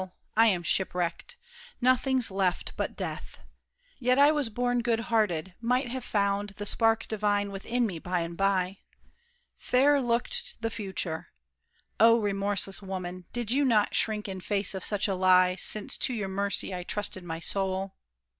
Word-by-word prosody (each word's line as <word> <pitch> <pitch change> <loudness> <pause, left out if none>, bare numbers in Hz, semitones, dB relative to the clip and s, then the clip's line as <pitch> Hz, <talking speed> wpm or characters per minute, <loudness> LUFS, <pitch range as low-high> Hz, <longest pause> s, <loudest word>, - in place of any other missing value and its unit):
I 225 +1 +6
am 185 -5 +1
shipwrecked! 180 - -1 0.4
Nothing's 255 -1 +2
left 190 -2 -1
but - - -3
death. - - -6 0.6
Yet 250 0 +2
I 285 +2 +7
was 295 -6 -1
born 245 +2 0
good 235 -1 +1
hearted: 190 -6 +1
might 245 +1 0
have 260 0 -4
found 200 -1 -1
The 205 - -5
spark 225 +1 +1
divine 205 -2 0
within 235 +5 -1
me 185 -7 -4
by 180 +1 -2
and 170 0 -5
by. 195 0 0 0.8
Fair 280 +3 +3
looked 235 -1 -1
the 225 0 -2
future! 190 -6 -4 0.7
Oh, 230 +2 +7
remorseless 200 -1 -1
woman, 185 -2 -6
Did 240 -2 -2
you 280 +3 +3
not 220 -6 +2
shrink 215 -2 0
in 190 -1 -6
face 200 0 -1
of 190 -1 -4
such 205 -1 +1
a 195 - 0
lie, 185 -1 +4
Since 205 +3 0
to 255 - 0
your 200 -4 -3
mercy 200 0 +1
I 180 - -4
trusted 190 0 -3
my 165 -2 -5
soul? 190 +2 -2
205 Hz, 160 wpm, -28 LUFS, 190-235 Hz, 0.8 s, I